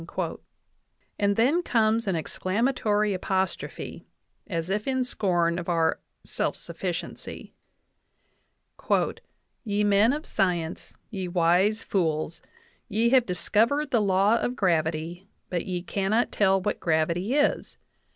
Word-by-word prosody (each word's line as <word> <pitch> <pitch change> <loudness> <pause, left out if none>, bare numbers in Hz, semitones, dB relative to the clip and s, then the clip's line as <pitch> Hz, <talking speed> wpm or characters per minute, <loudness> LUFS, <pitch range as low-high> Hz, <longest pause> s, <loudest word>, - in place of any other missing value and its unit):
And 200 0 +2
then 270 - +3
comes 225 -6 +1
an 190 - +1
exclamatory 210 - 0
apostrophe, 190 0 -3 0.4
as 170 -1 -3
if 210 +4 -1
in 260 -1 +1
scorn 175 -7 0
of 175 - -5
our 165 -2 +2 0.2
self - - -2
sufficiency: - - -6 2.1
"Ye 210 -2 0
men 205 +3 +4
of 300 +3 -3
science, 175 -3 -1 0.2
ye 190 -4 -3
wise 180 +5 +2
fools, 160 -3 -1 0.5
ye 225 +3 +2
have 255 -1 +4
discovered 230 +10 +1
the 235 - +3
law 200 +3 +3
of 245 - -2
gravity, 170 -1 -1 0.2
but 175 -2 -2
ye 180 -2 -3
cannot 200 +5 0
tell 195 -2 +3
what 190 - -2
gravity 170 - 0
is. 295 0 +1
195 Hz, 115 wpm, -26 LUFS, 175-225 Hz, 2.1 s, men